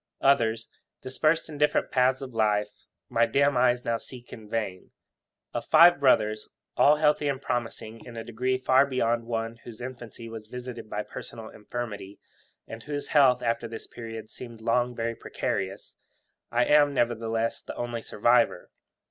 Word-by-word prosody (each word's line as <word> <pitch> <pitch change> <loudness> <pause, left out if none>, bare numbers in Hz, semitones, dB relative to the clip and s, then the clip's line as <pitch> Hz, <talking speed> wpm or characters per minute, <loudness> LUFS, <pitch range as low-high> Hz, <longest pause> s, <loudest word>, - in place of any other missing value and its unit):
Others, 115 -5 +2 0.3
dispersed 155 +5 0
in 150 -2 -9
different 150 0 +2
paths 130 +1 +2
of 130 -2 -8
life,'my 105 +2 0
dim 140 +4 +2
eyes 125 0 +2
now 115 0 +1
seek 125 +1 -11
for - - -6
in 110 -2 -14
vain.' 105 -5 -3 0.6
Of 120 - -3
five 170 +1 +7
brothers, 110 -6 +2 0.3
all 150 - +6
healthy 150 -1 +2
and 140 -2 -1
promising 115 -3 -4
in 120 -2 -10
a 115 - -4
degree 125 +3 -1
far 130 +2 +4
beyond 120 -3 0
one 115 0 -3
whose 115 -1 -12
infancy 120 -2 -8
was 110 -1 -9
visited 125 -1 -8
by 105 0 -3
personal 115 0 -8
infirmity, 105 -3 -7 0.5
and 110 - -8
whose 145 +1 -5
health 130 -4 +4
after 115 0 -1
this 115 0 -8
period 115 -2 -9
seemed 120 -3 -10
long 120 +2 +1
very 115 0 -2
precarious, 95 -3 -4 0.6
I 120 +1 +3
am, 145 -1 +4
nevertheless, 115 -1 0
the - - -8
only 120 -1 -4
survivor. 115 -3 +2
120 Hz, 155 wpm, -27 LUFS, 115-130 Hz, 0.6 s, five